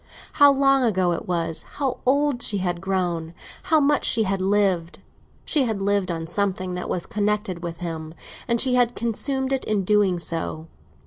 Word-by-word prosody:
How 285 -1 +7
long 275 0 +3
ago 190 -6 +2
it 170 - -4
was—how 180 - -2
old 280 -1 +2
she 205 - +2
had 175 -2 -2
grown—how 180 - -2
much 290 0 +2
she 225 - +3
had 195 -1 -1
lived! 190 -4 +1 0.5
She 290 -5 +2
had 220 -4 -2
lived 200 -1 0
on 165 -1 -3
something 185 +1 -2
that 180 - -5
was 175 - -2
connected 210 -3 -2
with 170 -1 -5
him, 160 -2 -6 0.3
and 235 -1 +1
she 255 0 +3
had 245 -1 +2
consumed 265 +4 -1
it 265 - -1
in 210 -2 0
doing 200 -2 +2
so. 85 - -4
195 Hz, 170 wpm, -23 LUFS, 175-245 Hz, 0.5 s, How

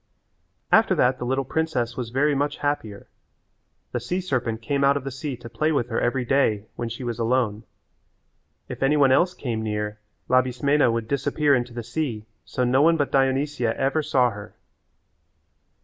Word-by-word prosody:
After - - +5
that 130 +1 +2
the 125 - -3
little 135 +2 0
princess 130 -6 -1
was 125 -3 -4
very 145 +5 +2
much 145 +1 -1
happier. 115 -9 -3 0.9
The 120 - -2
sea 125 +11 -2
serpent 125 -11 -2
came 140 +4 0
out 140 +1 +4
of 140 - -5
the 135 - -5
sea 135 0 -5
to 120 0 -10
play 155 +7 0
with 120 -6 0
her 115 - -1
every 125 +1 0
day 120 -6 +1
when 120 - -4
she 115 +3 -7
was 120 -1 -4
alone. 115 -2 0 1.0
If - - -8
any 140 +3 +3
one 135 -2 +5
else 180 +7 +3
came 115 -4 -3
near 105 -1 -3 0.3
Labismena 130 +2 +2
would 115 -1 -2
disappear 145 +2 +1
into 120 -2 -1
the 120 - -4
sea 120 -3 -3 0.2
so 125 - -2
no 125 +2 +3
one 165 +2 +4
but 145 -2 -1
Dionysia 135 -2 +1
ever 135 +4 +1
saw 130 -5 +2
her. 100 -1 -10
130 Hz, 180 wpm, -24 LUFS, 120-145 Hz, 1.0 s, After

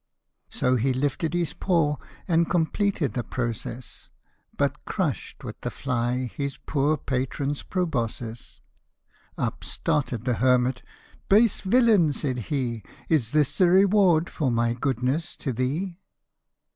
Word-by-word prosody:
So 125 0 +1
he 130 +3 +1
lifted 145 +5 -1
his 175 -2 0
paw, 160 -6 +1 0.3
and 170 -2 +2
completed 175 -1 +1
the 120 - -2
process, 120 +1 -4 0.5
But - - 0
crush'd - - -3
with - - -8
the - - -2
fly 125 -1 -1
his 140 -1 -3
poor 145 +2 0
patron's 135 +2 -2
proboscis! 120 - -3 0.7
12 - - 0
Up - - -18
started 125 -6 -1
the 125 - +2
hermit" 125 0 +3 0.5
Base 215 +1 +5
villain," 205 - +4
said 130 -3 -2
he, 125 -6 -1
" - - -25
Is 145 -9 +2
this 150 0 +2
the 180 -2 +6
reward 190 -3 +5
for 145 -5 -1
my 115 0 +1
goodness 130 +6 -1
to 135 - -3
thee 165 - -2
140 Hz, 135 wpm, -25 LUFS, 125-170 Hz, 0.7 s, the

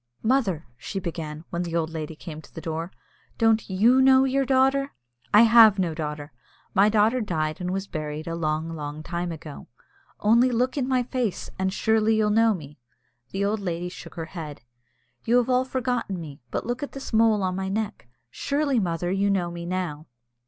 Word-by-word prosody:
"Mother," 220 - +1
she 195 - -5
began, 160 -3 -5
when 170 - -2
the 170 -1 -3
old 165 -1 0
lady 160 -1 -5
came 155 -1 -8
to - - -18
the - - -8
door, 165 +2 -4 0.5
"don't 225 -1 +2
you 230 +8 +4
know 265 0 +6
your 270 +1 +1
daughter?" 270 +1 +2 0.4
"I 210 +2 +8
have 225 -3 +7
no 175 -4 0
daughter; 150 -2 -5 0.4
my 200 +2 +5
daughter 220 +4 +3
died 155 -5 -2
and 180 - -2
was 195 +1 -2
buried 155 -3 -5
a 165 - -4
long, 160 0 -2
long 150 0 -6
time 175 +1 -3
ago." 155 -2 -9 0.5
"Only 235 +4 +4
look 250 +1 0
in 265 -3 -1
my 255 -2 +2
face, 240 -6 -3
and 190 0 +1
surely 220 +2 +2
you'll 215 -1 +2
know 225 0 +4
me." 145 -4 -11 0.5
The 195 +1 -1
old 210 +2 0
lady 175 -2 -3
shook - - -11
her 165 -2 -4
head. 150 -8 -7 0.6
"You 235 +2 +3
have 245 +1 +2
all 255 +1 +3
forgotten 245 -7 -2
me; 145 -5 -9
but - - -3
look 245 +2 -3
at 285 - -5
this 275 -3 -8
mole 220 -2 +4
on 185 -1 -1
my 190 0 -3
neck. 210 - -3 0.2
Surely, 280 - 0
mother, 175 -2 -1
you 195 +1 +1
know 180 -3 0
me 170 0 -6
now?" 170 -4 -3
190 Hz, 195 wpm, -25 LUFS, 165-230 Hz, 0.6 s, I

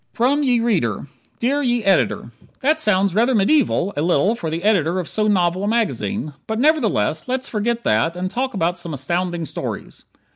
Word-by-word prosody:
From 265 +5 +2
Ye 250 -4 +2
Reader 170 - 0 0.3
Dear 275 +5 0
Ye 240 -4 0
Ed.: 195 0 +3 0.5
That 305 +4 +2
sounds 200 - +2
rather 240 +5 +2
medieval 205 - +2
a 145 - -1
little 175 +5 +2
for 170 -9 -4
the 165 +3 -4
editor 185 -4 +2
of 175 - -4
so 215 -1 0
novel 185 -2 +1
a - - -1
magazine, 215 -6 -1
but 220 - -2
nevertheless 225 - +1
let's 260 +1 -1
forget 235 +2 -2
that 115 +11 +1
and 185 +1 -3
talk 255 -1 -2
about 175 -1 0
some 170 -3 -5
astounding 170 +5 -2
stories. - - -6
205 Hz, 180 wpm, -20 LUFS, 175-240 Hz, 0.5 s, Ed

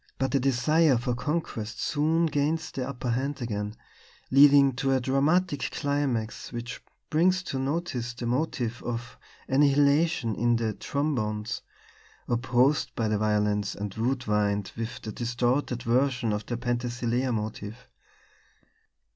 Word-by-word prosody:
But 135 0 0
the 140 - +2
desire 135 +3 +3
for 120 +1 -1
conquest 120 -5 -3
soon 160 +3 +1
gains 160 +1 0
the 130 -1 -4
upper 125 -2 -3
hand 135 +4 -1
again, 105 -3 -3 0.6
leading 140 0 +7
to 135 +1 +1
a 130 - +3
dramatic 145 +5 +1
climax 140 -6 -2
which 120 +1 -6 0.3
brings 185 +4 +3
to 135 -6 -3
notice 135 -5 -2
the 120 - -5
motive 120 -2 -1
of 120 0 -5 0.3
annihilation 140 -1 +3
in 120 +2 +2
the 115 -2 -1
trombones 110 -6 -2 0.7
opposed 125 +4 +2
by 110 -2 0
the 105 -1 +1
violins 105 -1 +1
and 100 -1 -5
wood 125 +3 -1
wind 105 -2 0
with 115 0 -5
a 110 - -4
distorted 120 +2 -1
version 120 -2 +1
of 105 0 -4
the 120 - -2
Penthesilea 120 +1 -1
motive. 110 +1 -5
125 Hz, 130 wpm, -27 LUFS, 115-140 Hz, 0.7 s, leading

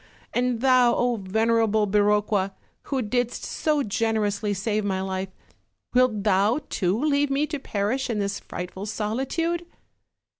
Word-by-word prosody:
And 245 -1 0
thou, 245 -2 +3
venerable 220 +2 +2
Biroqua! 205 -1 +2 0.3
who 265 -3 -1
didst 245 +2 -1
so 300 -2 0
generously 210 -1 0
save 210 +2 -1
my 195 -2 -1
life, 190 0 -3 0.6
wilt 250 -5 +3
thou 210 +6 +3
too 190 +3 0
leave 290 0 +2
me 275 +2 +1
to 300 -1 -4
perish 245 +2 -1
in 230 - -1
this 200 -1 -1
frightful 190 +3 -6
solitude?" 270 +11 -1
220 Hz, 125 wpm, -25 LUFS, 205-255 Hz, 0.6 s, thou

